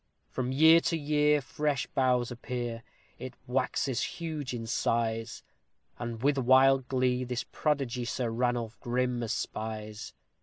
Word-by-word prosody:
From 130 0 -2
year 160 +4 +7
to 165 0 -1
year 150 0 +2
fresh 145 0 -1
boughs 125 -2 +1
appear 120 -1 -4 0.4
it 130 -1 -7
waxes 130 0 0
huge 155 -5 -4
in 120 -2 -4
size; 115 0 -1 0.6
And, 120 -1 -5
with 140 0 +3
wild 130 +1 +5
glee, 130 -1 +1
this 125 -1 -3
prodigy 135 -5 -1
Sir 120 0 -2
Ranulph 120 -1 -1
grim 125 0 -1
espies. 110 -1 -4
125 Hz, 125 wpm, -29 LUFS, 120-135 Hz, 0.6 s, year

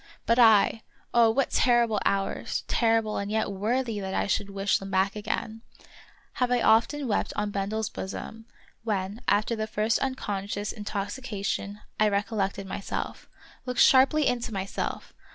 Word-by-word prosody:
But 230 +2 +3
I 220 -1 +5 0.2
— - - -36
oh, 235 -1 +6
what 260 +4 +1
terrible 235 -4 +3
hours 195 0 -1
— - - -39
terrible 225 -2 +1
and 200 0 -3
yet 220 -1 0
worthy 225 +3 -1
that 190 -1 -4
I - - +1
should 200 0 -1
wish 195 0 0
them 195 - -8
back 190 +1 +1
again 220 +1 -4 0.4
— - - -25
have 250 - +3
I 245 - +3
often 235 +6 +3
wept 215 - 0
on 210 0 -1
Bendel's 205 +2 -2
bosom, 220 +4 -7 0.4
when, 205 0 -2
after 215 +3 +2
the 215 0 -3
first 215 +1 0
unconscious 205 -6 -3
intoxication, 205 -1 -4 0.2
I 215 0 +4
recol 205 +2 -1
lected 195 0 -1
myself; 195 +1 -5 0.4
looked 250 0 -2
sharply 275 +3 +5
into 240 -2 -1
myself 195 -1 -4
215 Hz, 160 wpm, -27 LUFS, 200-230 Hz, 0.4 s, oh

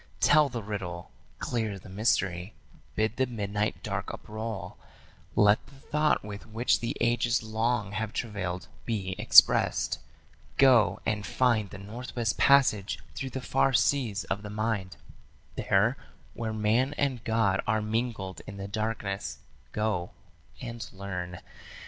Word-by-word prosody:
Tell 150 -2 +5
the 120 -4 -5
riddle; 95 -5 -5 0.3
clear 110 -4 -2
the 95 - -13
mystery; 95 -2 0 0.4
bid 110 +1 0
the 130 -1 +2
midnight 105 -2 -2
dark - - -3
uproll; 110 -1 -6 0.6
Let 105 +1 +5
the 140 - -17
thought 150 +2 +1
with 105 +1 -8
which 115 +3 +1
the 115 - -3
ages 120 0 +2
long 110 -1 0
have 105 +1 -3
travailed 95 -7 -3 0.2
be 95 -3 -2
expressd. - - +6 0.6
Go 125 -6 +5
and 105 -2 0
find 115 -3 +1
the 95 - -9
Northwest 115 +2 -4
Passage 125 -8 +4 0.2
through 135 - -4
the 130 - -5
far 135 - +2
seas 125 -5 +2
of 100 - -3
the 105 - -7
mind, 105 -4 -2 0.6
There, 105 +7 +2 0.4
where 115 -1 -3
man 110 +6 +1
and 130 -5 0
God 110 -4 +2
are 110 0 +2
mingled 110 -3 -2
in 100 - -7
the 100 0 -5
darkness, 105 -2 -3 0.3
go 105 -5 -1 0.5
and 115 -1 -6
learn. 90 -2 -6
110 Hz, 135 wpm, -28 LUFS, 100-120 Hz, 0.6 s, expressd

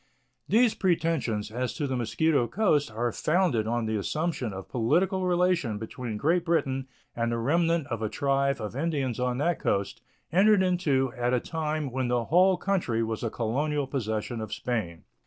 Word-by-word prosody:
These 230 +1 +4
pretensions 160 - 0
as 125 +1 -3
to 145 - -2
the 130 -2 -2
Mosquito 125 +3 +1
Coast 150 - +1
are 115 +2 -1
founded 155 - +1
on 120 0 0
the 110 0 -1
assumption 150 - -2
of 95 0 -7
political 185 - +1
relation 175 - +1
between 110 +1 -5
Great 165 +9 +2
Britain 135 -6 0 0.3
and 115 0 0
the 115 - -1
remnant 165 +6 +1
of 115 -5 -4
a 110 - -1
tribe 140 +1 0
of 105 +2 -5
Indians 140 -5 -1
on 125 0 0
that 165 +5 0
coast, 100 +2 -1 0.3
entered 195 +3 +5
into 145 -9 +1
at 125 +1 +1
a - - +2
time 155 -1 -3
when 130 0 -1
the 120 -1 0
whole 185 +5 +4
country 170 - 0
was 110 -1 -3
a 115 - -1
colonial 140 +7 -1
possession 115 -3 -3
of 110 -1 -6
Spain. 90 -10 -3
135 Hz, 175 wpm, -27 LUFS, 115-165 Hz, 0.3 s, entered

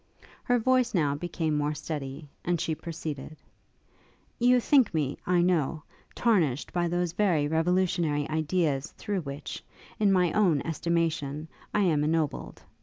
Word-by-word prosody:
Her 245 - +2
voice 250 -1 +2
now 150 -5 +2
became 160 0 -2
more 150 +1 0
steady, 145 -1 -5 0.2
and 175 -1 0
she 160 - -1
proceeded. 155 -2 -6 1.0
'You 250 +1 +5
think 265 -1 +4
me, 145 -3 -1
I 175 -1 +3
know, 165 -4 +1 0.3
tarnished 165 - +1
by 175 -1 +1
those 175 0 -1
very 175 -8 +2
revolutionary 165 -2 +1
ideas 155 -2 0
through 205 -3 -2
which, 140 -1 -7 0.4
in 205 -2 +4
my 180 -3 +3
own 175 -9 +3
estimation, 160 -3 -1 0.2
I 210 - +1
am 160 -6 +2
ennobled. 155 -1 -1
165 Hz, 135 wpm, -28 LUFS, 150-180 Hz, 1.0 s, You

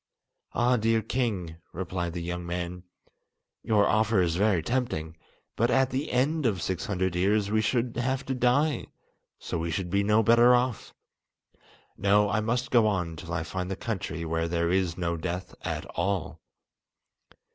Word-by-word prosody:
"Ah, 125 +1 +3
dear 110 0 +2
king," 105 -9 -2 0.2
replied 90 -1 -3
the 85 -1 -4
young 90 +1 -4
man, 90 +1 -4 0.8
"your 105 -2 +3
offer 110 -1 +2
is 85 -2 +2
very 95 -3 +2
tempting! 85 -8 -2 0.4
But 120 +2 +2
at 135 0 +3
the 135 +4 -2
end 140 +3 +1
of 100 -5 0
six 90 +1 -3
hundred 95 -3 -1
years 100 +3 +2
we 110 0 +3
should 120 +2 0
have 130 +2 -1
to 135 - -2
die, 130 +5 +1 0.5
so - - -4
we 85 +1 -2
should 90 0 -3
be 100 +1 +3
no 105 +2 +3
better 120 +3 +6
off! 125 -2 -2 1.0
No, 100 0 +3
I 105 - +2
must 120 +4 -1
go 115 -3 +5
on 90 -5 -1
till 85 +1 -9
I 85 -1 -1
find 90 +2 -4
the 95 - -2
country 95 -7 -4
where 80 +1 -1
there 85 0 0
is 90 -2 +1
no 85 -2 -1
death 90 +2 -4
at - - -3
all." 95 -1 -2
100 Hz, 170 wpm, -27 LUFS, 85-120 Hz, 1.0 s, better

